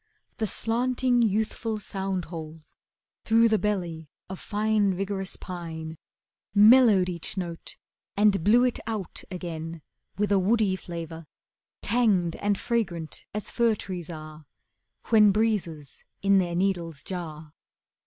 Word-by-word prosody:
The 220 - -1
slanting, 245 +3 +1
youthful 220 +1 0
sound 195 -3 -3
holes 160 -2 -9 0.5
through 230 +1 +4
The 215 -1 +2
belly 175 -7 -2 0.2
of 190 - -6
fine, 210 -2 +1
vigorous 195 0 -3
pine 165 -3 -7 0.6
Mellowed 210 -3 +7
each 175 +1 -4
note 170 -3 -5 0.4
and 205 -4 +4
blew 235 +6 +5
It 250 -1 +1
out 215 -5 -4
again 165 -3 -6 0.3
with 205 0 0
a 200 - +5
woody 205 0 +2
flavour 165 -3 -7 0.6
Tanged 205 -7 +2
and 205 -1 0
fragrant 185 -10 -2
as 210 - -4
fir 235 -2 +2
trees 180 -5 -6
are 155 -2 -9 0.6
When 215 -3 +6
breezes 190 -9 -1 0.2
in 200 0 +5
their 175 -2 -1
needles 175 -5 -1
jar. 160 -4 -7
195 Hz, 125 wpm, -26 LUFS, 170-215 Hz, 0.6 s, Mellowed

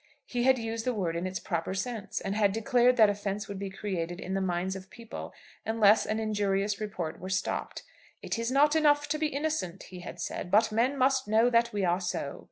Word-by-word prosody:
He 245 -1 -1
had 260 0 +5
used 225 -1 -3
the 250 0 -1
word 175 -5 -1
in 170 +2 -2
its 185 0 -4
proper 170 +1 -3
sense, 225 +1 -3
and 195 - -3
had 205 -2 +2
declared 245 +2 +3
that 220 -2 +8
offence 205 0 -2
would 200 -1 -6
be 200 -1 -4
created 180 -3 -4
in 190 - -5
the 195 - 0
minds 185 +1 -1
of 190 0 -9
people 230 -1 -8 0.3
unless 220 -1 +4
an 215 +1 -1
injurious 205 -1 0
report 180 -6 -4
were 185 - -7
stopped. 185 -1 -2 0.4
"It - - -2
is 230 +1 -1
not 295 +3 +4
enough 290 -2 +4
to 305 +1 0
be 310 - +2
innocent," 280 - -2
he 180 - -10
had 175 - -9
said, 180 - -4
"but 215 +3 +4
men 245 +6 +1
must 265 -1 +2
know 225 +3 +4
that 235 0 +3
we 205 -2 0
are 175 +2 +1
so." 175 -5 -3
210 Hz, 220 wpm, -29 LUFS, 190-240 Hz, 0.4 s, that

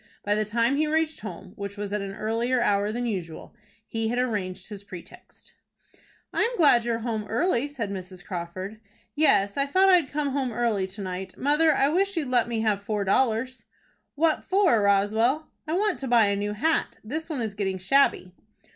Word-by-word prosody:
By 205 - +1
the 215 +1 0
time 230 +5 +1
he 310 +1 +1
reached 315 0 0
home, 200 -3 -9
which 200 0 -6
was 205 0 -4
at 210 - -1
an 195 0 -6
earlier 230 +4 0
hour 205 -2 +1
than 240 +2 -3
usual, 180 -8 -5 0.3
he 225 0 -2
had 240 +2 -1
arranged 200 -7 -2
his 205 -2 -8
pretext. 180 -3 -13 0.8
"I - - 0
am 475 +2 +1
glad 285 - +5
you 235 - 0
are - - 0
home 220 -3 -2
early," 245 - +1
said 235 -8 -5
Mrs. 185 -1 -8
Crawford. 185 +3 -6 0.3
"Yes, 270 -9 +3
I 275 0 +1
thought 380 +7 +4
I'd 350 -7 +4
come 290 -1 -1
home 265 -2 -1
early 220 -5 0
to 195 +2 -9
night. 185 0 -6
Mother, 300 +2 +3
I 275 - +3
wish 390 +4 0
you'd 295 -5 -1
let 245 -2 +2
me 230 -2 -2
have 210 -2 +1
four 205 0 -2
dollars." 245 +5 0 0.5
"What 315 +1 +1
for, 375 - +3
Roswell?" 220 +9 +2 0.2
"I 315 - -2
want 405 +1 +1
to 270 - -4
buy 235 -3 +5
a 200 - +1
new 205 +1 -2
hat. 320 +10 0
This 310 +9 -5
one 290 -6 -3
is 220 -3 -3
getting 195 -2 -2
shabby." 190 -2 +2
225 Hz, 200 wpm, -26 LUFS, 200-280 Hz, 0.8 s, glad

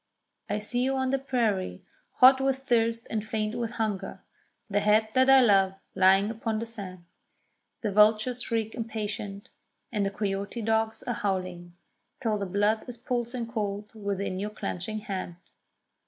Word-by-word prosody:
I 205 - 0
see 230 +4 0
you 270 +1 +1
on 260 -1 0
the 270 - +1
prairie, 220 - -1 0.3
hot 260 +1 +7
with 270 0 0
thirst 230 -2 +1
and 215 -2 -1
faint 215 0 -2
with 235 -1 -3
hunger; 210 -4 -3 0.4
The 205 -2 +1
head 215 +1 +3
that 260 +1 +4
I 270 0 +8
love 195 -5 +4 0.2
lying 190 +1 +5
low - - -2
upon 225 0 -2
the 225 - -3
sand. 190 -6 -9 0.8
The 210 - -1
vultures 215 +4 +4
shriek 225 -2 -2
impatient, 210 -3 -5 0.4
and 210 -3 0
the 195 - +1
coyote 200 +2 -3
dogs 220 0 0
are 245 - -2
howling, 185 -4 -3 0.4
Till 220 -4 0
the 200 - -2
blood 205 +5 +1
is 245 - -7
pulsing 240 0 -2
cold 210 -2 -4
within 200 -3 -3
your 205 +2 -2
clenching 210 0 -4
hand. 190 -4 -5
215 Hz, 160 wpm, -28 LUFS, 200-235 Hz, 0.8 s, I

